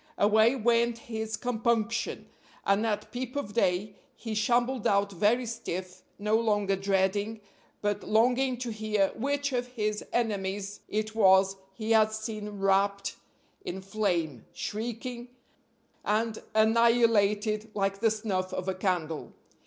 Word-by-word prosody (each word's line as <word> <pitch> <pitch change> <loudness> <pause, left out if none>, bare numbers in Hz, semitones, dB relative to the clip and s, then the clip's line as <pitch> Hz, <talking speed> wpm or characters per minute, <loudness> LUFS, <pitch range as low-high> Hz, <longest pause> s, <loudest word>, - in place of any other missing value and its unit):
Away 220 +4 +4
went 235 -1 +2
his 220 -1 -4
compunction, 230 -2 -1 0.4
and 200 +3 +2
at 210 -2 -2
peep 250 +1 -5
of 285 -8 -3
day 200 -1 0 0.2
he 225 -2 -5
shambled 240 +3 +1
out 200 0 +2
very 215 +7 +2
stiff, 185 -5 -5 0.2
no 210 +1 +1
longer 205 -3 +1
dreading, 195 +3 0 0.4
but 205 -1 0
longing 245 +4 +2
to 240 -1 -4
hear 215 -2 +1
which 280 +3 -1
of 245 0 -1
his 215 -4 -2
enemies 200 -3 -2
it 215 +1 -2
was 195 -2 +5 0.2
he 220 +1 -3
had 220 -1 +5
seen 220 -1 -4
wrapped 195 0 +1 0.5
in 190 - -4
flame, 185 - -2
shrieking, 240 +3 -5 0.8
and 220 +1 0
annihilated 220 -1 +3
like 195 -1 0
the 225 +1 +4
snuff 205 -4 -2
of 185 0 -4
a 190 - +1
candle. 180 -5 -2
215 Hz, 130 wpm, -29 LUFS, 200-230 Hz, 0.8 s, was